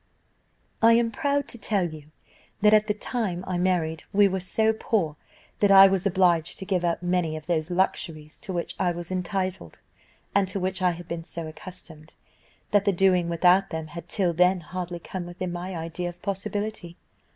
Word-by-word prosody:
"I 230 Hz, +1 st, +7 dB
am 230 Hz, 0 st, +3 dB
proud 285 Hz, +4 st, 0 dB
to 240 Hz, -, -6 dB
tell 195 Hz, -6 st, 0 dB
you, 150 Hz, -2 st, -11 dB, 0.5 s
that 210 Hz, 0 st, +6 dB
at 215 Hz, 0 st, +5 dB
the 210 Hz, -, +2 dB
time 210 Hz, -6 st, -3 dB
I 180 Hz, -1 st, -2 dB
married 170 Hz, -3 st, 0 dB
we 205 Hz, 0 st, +5 dB
were 190 Hz, 0 st, -1 dB
so 220 Hz, +4 st, +2 dB
poor, 195 Hz, -8 st, -1 dB, 0.4 s
that 205 Hz, -, +4 dB
I 195 Hz, 0 st, +10 dB
was 195 Hz, 0 st, +2 dB
obliged 175 Hz, -4 st, +2 dB
to 190 Hz, -, -7 dB
give 185 Hz, -2 st, 0 dB
up 170 Hz, 0 st, -1 dB
many 175 Hz, -3 st, 0 dB
of 155 Hz, -, -10 dB
those 165 Hz, -1 st, -1 dB
luxuries 165 Hz, -4 st, -2 dB
to 215 Hz, -, -7 dB
which 175 Hz, -2 st, -3 dB
I 185 Hz, -, +2 dB
was 175 Hz, 0 st, -5 dB
entitled, 185 Hz, +1 st, -3 dB, 0.6 s
and 200 Hz, -1 st, +3 dB
to 185 Hz, +1 st, -3 dB
which 185 Hz, 0 st, -2 dB
I 180 Hz, -, +4 dB
had 170 Hz, 0 st, -10 dB
been 170 Hz, -1 st, -4 dB
so 170 Hz, -1 st, -7 dB
accustomed, 160 Hz, -2 st, -11 dB, 0.6 s
that 205 Hz, -1 st, +3 dB
the 200 Hz, -, +4 dB
doing 180 Hz, -2 st, +2 dB
without 180 Hz, +3 st, +4 dB
them 160 Hz, -1 st, -5 dB
had 170 Hz, -, -8 dB
till 185 Hz, -5 st, +1 dB
then 180 Hz, +2 st, +3 dB
hardly 175 Hz, +2 st, -5 dB
come 175 Hz, +1 st, -6 dB
within 175 Hz, +1 st, -5 dB
my 180 Hz, +2 st, -5 dB
idea 165 Hz, +2 st, -4 dB
of 175 Hz, 0 st, -12 dB
possibility. 200 Hz, -2 st, -4 dB
180 Hz, 190 wpm, -26 LUFS, 170-195 Hz, 0.6 s, I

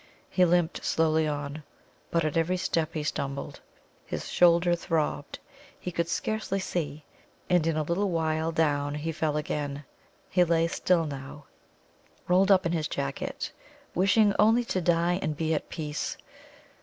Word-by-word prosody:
He 185 Hz, -, +4 dB
limped 175 Hz, -1 st, +1 dB
slowly 160 Hz, -1 st, +2 dB
on. 145 Hz, 0 st, -4 dB, 0.5 s
But 165 Hz, -2 st, +1 dB
at 155 Hz, -, -1 dB
every 165 Hz, +3 st, +1 dB
step 165 Hz, -3 st, -1 dB
he 155 Hz, -, -1 dB
stumbled. 140 Hz, -1 st, -4 dB, 0.4 s
His -, -, -5 dB
shoulder 175 Hz, 0 st, +4 dB
throbbed. 155 Hz, -3 st, -2 dB, 0.4 s
He 180 Hz, -, -5 dB
could 170 Hz, 0 st, -1 dB
scarcely 215 Hz, +2 st, -1 dB
see, 155 Hz, -5 st, -3 dB, 0.5 s
and 175 Hz, -3 st, +4 dB
in 160 Hz, -1 st, +1 dB
a 155 Hz, -, +1 dB
little 180 Hz, +6 st, 0 dB
while 160 Hz, -1 st, 0 dB
down 145 Hz, -3 st, +1 dB
he 155 Hz, +2 st, -3 dB
fell 155 Hz, -1 st, -1 dB
again. 145 Hz, -1 st, -3 dB, 0.4 s
He 180 Hz, -1 st, +3 dB
lay 165 Hz, -1 st, +2 dB
still 170 Hz, 0 st, +1 dB
now, 140 Hz, 0 st, -7 dB, 0.8 s
rolled 185 Hz, +2 st, +4 dB
up 185 Hz, -2 st, +5 dB
in 165 Hz, -, +1 dB
his 160 Hz, -3 st, 0 dB
jacket, 140 Hz, -1 st, -4 dB, 0.4 s
wishing 200 Hz, +3 st, +4 dB
only 225 Hz, +3 st, +5 dB
to 185 Hz, -, -1 dB
die 175 Hz, +1 st, +2 dB
and 150 Hz, -2 st, -2 dB
be 160 Hz, 0 st, 0 dB
at 155 Hz, -, -2 dB
peace. 150 Hz, -2 st, -4 dB
165 Hz, 155 wpm, -28 LUFS, 150-175 Hz, 0.8 s, up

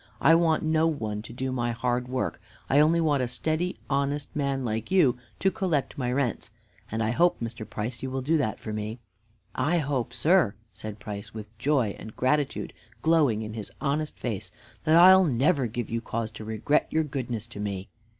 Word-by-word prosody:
I 165 Hz, -, +6 dB
want 165 Hz, -1 st, +3 dB
no 160 Hz, 0 st, +3 dB
one 110 Hz, -10 st, -2 dB
to 110 Hz, -, -10 dB
do 130 Hz, +2 st, -3 dB
my 120 Hz, -2 st, -1 dB
hard 125 Hz, +1 st, -1 dB
work. 130 Hz, 0 st, -2 dB, 0.3 s
I 140 Hz, -, +6 dB
only 160 Hz, +3 st, +5 dB
want 150 Hz, -4 st, +2 dB
a 125 Hz, -, 0 dB
steady, 155 Hz, +8 st, -1 dB
honest 140 Hz, +1 st, -1 dB
man, 140 Hz, -3 st, -1 dB
like 110 Hz, -1 st, -2 dB
you, 155 Hz, -10 st, +4 dB, 0.2 s
to 190 Hz, -, +2 dB
collect 180 Hz, -10 st, -1 dB
my 125 Hz, -3 st, -1 dB
rents, 125 Hz, -4 st, -1 dB, 0.4 s
and 110 Hz, +1 st, 0 dB
I 110 Hz, -, +1 dB
hope, 175 Hz, +8 st, +3 dB
Mr. 115 Hz, -2 st, -5 dB
Price, 115 Hz, +3 st, -4 dB
you 130 Hz, -, -3 dB
will 130 Hz, 0 st, -3 dB
do 160 Hz, +5 st, +2 dB
that 120 Hz, -8 st, -1 dB
for 110 Hz, -, -6 dB
me." 105 Hz, +2 st, -4 dB, 0.6 s
"I 155 Hz, +7 st, +1 dB
hope, 135 Hz, -6 st, -1 dB
sir," 150 Hz, -, +3 dB, 0.2 s
said 110 Hz, -1 st, -7 dB
Price, 105 Hz, +1 st, -7 dB
with 110 Hz, 0 st, -8 dB
joy 130 Hz, -5 st, +1 dB
and 110 Hz, -, -9 dB
gratitude 140 Hz, +2 st, 0 dB, 0.3 s
glowing 150 Hz, -10 st, +3 dB
in 110 Hz, 0 st, -6 dB
his 110 Hz, -2 st, -6 dB
honest 150 Hz, +2 st, -1 dB
face, 110 Hz, -6 st, -4 dB, 0.3 s
"that 155 Hz, -, +5 dB
I'll 190 Hz, +2 st, +9 dB
never 135 Hz, 0 st, +2 dB
give 115 Hz, 0 st, -4 dB
you 115 Hz, 0 st, -1 dB
cause 115 Hz, -1 st, -3 dB
to 110 Hz, +1 st, -9 dB
regret 110 Hz, +7 st, +1 dB
your 160 Hz, -, +1 dB
goodness 125 Hz, -7 st, -3 dB
to 110 Hz, -, -9 dB
me." 100 Hz, -2 st, -3 dB
130 Hz, 195 wpm, -27 LUFS, 110-150 Hz, 0.6 s, I'll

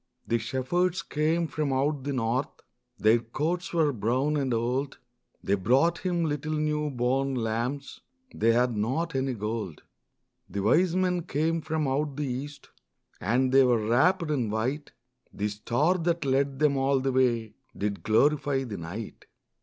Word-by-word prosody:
The 115 Hz, -, +1 dB
shepherds 145 Hz, +10 st, -1 dB
came 160 Hz, +3 st, 0 dB
from 150 Hz, -3 st, -2 dB
out 140 Hz, +1 st, 0 dB
the 145 Hz, -, -1 dB
north, 125 Hz, +2 st, 0 dB, 0.5 s
Their 110 Hz, +2 st, +4 dB
coats 160 Hz, +10 st, -3 dB
were 160 Hz, -4 st, +2 dB
brown 130 Hz, +7 st, 0 dB
and 135 Hz, -3 st, 0 dB
old, 125 Hz, +4 st, -1 dB, 0.5 s
They 100 Hz, -, 0 dB
brought 130 Hz, -, +2 dB
Him 175 Hz, -3 st, 0 dB
little 150 Hz, 0 st, -2 dB
new 150 Hz, 0 st, 0 dB
born 135 Hz, +1 st, 0 dB
lambs 120 Hz, +4 st, -3 dB, 0.3 s
They 115 Hz, -, +3 dB
had 120 Hz, 0 st, +2 dB
not 130 Hz, +11 st, -1 dB
any 135 Hz, -1 st, -1 dB
gold. 105 Hz, -5 st, -4 dB, 0.7 s
The 100 Hz, +2 st, -3 dB
wise 165 Hz, -, +3 dB
men 180 Hz, -1 st, +1 dB
came 165 Hz, +1 st, 0 dB
from 155 Hz, -1 st, -1 dB
out 140 Hz, +1 st, -1 dB
the 150 Hz, -, -1 dB
east, 140 Hz, +3 st, -6 dB, 0.5 s
And 125 Hz, +6 st, +1 dB
they 135 Hz, 0 st, +6 dB
were 115 Hz, -4 st, +2 dB
wrapped 165 Hz, +7 st, +3 dB
in 125 Hz, -7 st, 0 dB
white; 125 Hz, +8 st, -2 dB, 0.4 s
The 105 Hz, +1 st, -2 dB
star 130 Hz, -, 0 dB
that 170 Hz, -2 st, 0 dB
led 135 Hz, 0 st, +1 dB
them 145 Hz, -1 st, +2 dB
all 135 Hz, 0 st, +2 dB
the 135 Hz, +1 st, 0 dB
way 120 Hz, -4 st, +1 dB, 0.2 s
Did 100 Hz, 0 st, -2 dB
glorify 140 Hz, +4 st, +2 dB
the 110 Hz, -6 st, -6 dB
night. 95 Hz, +7 st, -7 dB
135 Hz, 155 wpm, -27 LUFS, 115-150 Hz, 0.7 s, they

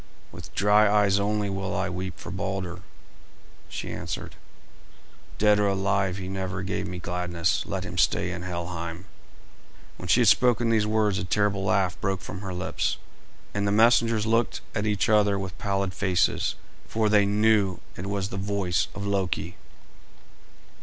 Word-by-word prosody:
"With -, -, -11 dB
dry 105 Hz, +1 st, +5 dB
eyes 100 Hz, -1 st, +3 dB
only 105 Hz, 0 st, 0 dB
will 95 Hz, -1 st, -3 dB
I 95 Hz, -, 0 dB
weep 95 Hz, 0 st, -5 dB
for -, -, -8 dB
Balder," 95 Hz, -2 st, -4 dB, 0.9 s
she -, -, -5 dB
answered. -, -, -5 dB, 1.0 s
"Dead 105 Hz, 0 st, +4 dB
or 105 Hz, -, +3 dB
alive, 95 Hz, -1 st, 0 dB
he 95 Hz, -1 st, -5 dB
never 95 Hz, -1 st, -3 dB
gave 100 Hz, +1 st, -3 dB
me 90 Hz, -1 st, -5 dB
gladness. 85 Hz, -1 st, -1 dB
Let -, -, -3 dB
him -, -, -4 dB
stay 90 Hz, -, +2 dB
in 90 Hz, -1 st, -5 dB
Helheim." 85 Hz, -1 st, -5 dB, 0.9 s
When 90 Hz, -, -7 dB
she 125 Hz, -, +5 dB
had 120 Hz, -, +4 dB
spoken 120 Hz, 0 st, +4 dB
these 110 Hz, -2 st, +2 dB
words 105 Hz, -2 st, +1 dB
a -, -, -3 dB
terrible 100 Hz, +1 st, +1 dB
laugh 95 Hz, -1 st, +1 dB
broke 95 Hz, -1 st, -1 dB
from 95 Hz, -, -7 dB
her 95 Hz, -2 st, -5 dB
lips, 90 Hz, +1 st, -2 dB, 0.6 s
and 100 Hz, 0 st, 0 dB
the -, -, +1 dB
messengers 115 Hz, 0 st, +4 dB
looked 115 Hz, +1 st, +1 dB
at 110 Hz, 0 st, -1 dB
each 105 Hz, -2 st, +1 dB
other 105 Hz, -2 st, +4 dB
with 95 Hz, -3 st, -5 dB
pallid 100 Hz, -3 st, -1 dB
faces, 90 Hz, -3 st, +1 dB, 0.3 s
for 110 Hz, -1 st, 0 dB
they 105 Hz, -1 st, +4 dB
knew 105 Hz, -3 st, +3 dB, 0.2 s
it 95 Hz, -, -6 dB
was 100 Hz, -1 st, -2 dB
the 95 Hz, -, -5 dB
voice 95 Hz, -4 st, 0 dB
of 100 Hz, -, -5 dB
Loki. 90 Hz, -4 st, -1 dB
100 Hz, 160 wpm, -26 LUFS, 90-105 Hz, 1.0 s, dry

